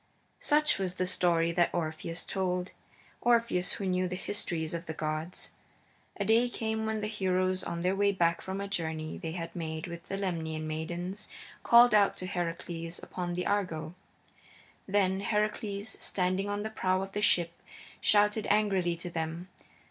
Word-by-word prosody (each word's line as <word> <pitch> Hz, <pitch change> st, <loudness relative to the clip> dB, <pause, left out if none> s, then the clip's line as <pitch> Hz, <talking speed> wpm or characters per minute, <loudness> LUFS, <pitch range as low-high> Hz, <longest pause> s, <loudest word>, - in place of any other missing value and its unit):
Such 300 Hz, -5 st, +3 dB
was 185 Hz, -2 st, -1 dB
the 185 Hz, -, 0 dB
story 170 Hz, -2 st, +2 dB
that 175 Hz, 0 st, +3 dB
Orpheus 165 Hz, +1 st, -2 dB
told 180 Hz, -1 st, -1 dB, 0.5 s
Orpheus 235 Hz, -6 st, +2 dB
who 200 Hz, -, -4 dB
knew 185 Hz, 0 st, +1 dB
the 180 Hz, -, -3 dB
histories 170 Hz, -4 st, -3 dB
of 170 Hz, +1 st, -4 dB
the 160 Hz, -, -4 dB
gods. 155 Hz, +3 st, -4 dB, 0.7 s
A -, -, 0 dB
day 230 Hz, +3 st, +4 dB
came 220 Hz, -2 st, -2 dB
when 220 Hz, -1 st, -1 dB
the 210 Hz, -, -1 dB
heroes, 185 Hz, -3 st, +1 dB
on 170 Hz, -, -3 dB
their 185 Hz, +2 st, +2 dB
way 200 Hz, 0 st, +3 dB
back 170 Hz, -3 st, +2 dB
from 190 Hz, +1 st, -4 dB
a 200 Hz, -, -3 dB
journey 160 Hz, -4 st, -3 dB
they 165 Hz, -3 st, -4 dB
had 165 Hz, -1 st, -5 dB
made 160 Hz, -2 st, -3 dB
with 170 Hz, +1 st, -8 dB
the 195 Hz, -, -3 dB
Lemnian 160 Hz, -5 st, -2 dB
maidens, 175 Hz, +6 st, -4 dB, 0.3 s
called 235 Hz, -1 st, +7 dB
out 205 Hz, -2 st, +5 dB
to 185 Hz, -, -5 dB
Heracles 170 Hz, -2 st, -3 dB
upon 175 Hz, -1 st, -4 dB
the 180 Hz, -, -2 dB
Argo. 180 Hz, -6 st, -1 dB, 0.9 s
Then 190 Hz, -1 st, +2 dB
Heracles, 210 Hz, 0 st, -1 dB
standing 185 Hz, +1 st, 0 dB
on 205 Hz, 0 st, -1 dB
the 220 Hz, -, -4 dB
prow 185 Hz, -2 st, +1 dB
of 195 Hz, -, -7 dB
the 205 Hz, -, -2 dB
ship, 170 Hz, -4 st, +2 dB, 0.4 s
shouted 210 Hz, +1 st, +3 dB
angrily 195 Hz, -5 st, +2 dB
to 175 Hz, +1 st, -6 dB
them. 165 Hz, +2 st, -3 dB
185 Hz, 165 wpm, -30 LUFS, 170-205 Hz, 0.9 s, called